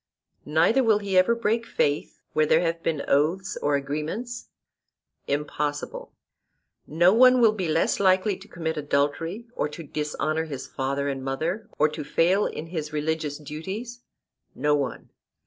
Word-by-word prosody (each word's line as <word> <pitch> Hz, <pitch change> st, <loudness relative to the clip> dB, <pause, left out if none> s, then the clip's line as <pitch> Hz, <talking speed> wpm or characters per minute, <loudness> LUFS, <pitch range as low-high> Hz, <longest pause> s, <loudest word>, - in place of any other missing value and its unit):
Neither 170 Hz, -, +3 dB
will 220 Hz, -3 st, +4 dB
he 200 Hz, -2 st, -3 dB
ever 185 Hz, +6 st, +5 dB
break 230 Hz, 0 st, 0 dB
faith 145 Hz, -9 st, -1 dB
where 155 Hz, 0 st, +3 dB
there 160 Hz, -, +4 dB
have 165 Hz, -1 st, -1 dB
been 155 Hz, -4 st, -1 dB
oaths 165 Hz, +7 st, +1 dB
or 145 Hz, 0 st, +2 dB
agreements? 155 Hz, -, -4 dB, 0.8 s
Impossible. 145 Hz, 0 st, -3 dB, 0.8 s
No 175 Hz, +5 st, +4 dB
one 255 Hz, +2 st, +7 dB
will 230 Hz, -3 st, +6 dB
be 195 Hz, -5 st, -3 dB
less 160 Hz, +1 st, +1 dB
likely 190 Hz, +1 st, +3 dB
to 200 Hz, -, -14 dB
commit 160 Hz, -5 st, -4 dB
adultery, 150 Hz, +8 st, -1 dB
or 150 Hz, -, -1 dB
to 165 Hz, +3 st, -8 dB
dishonour 155 Hz, +1 st, -2 dB
his 140 Hz, -4 st, -6 dB
father 140 Hz, +1 st, -2 dB
and 135 Hz, -1 st, -3 dB
mother, 160 Hz, +11 st, -3 dB
or 150 Hz, -, +4 dB
to 155 Hz, 0 st, -6 dB
fail 180 Hz, +7 st, +2 dB
in 155 Hz, -, -6 dB
his 160 Hz, -3 st, -5 dB
religious 150 Hz, -1 st, -2 dB
duties? 190 Hz, -, -6 dB, 0.6 s
No 150 Hz, 0 st, +1 dB
one. 145 Hz, -2 st, -2 dB
160 Hz, 150 wpm, -25 LUFS, 150-195 Hz, 0.8 s, one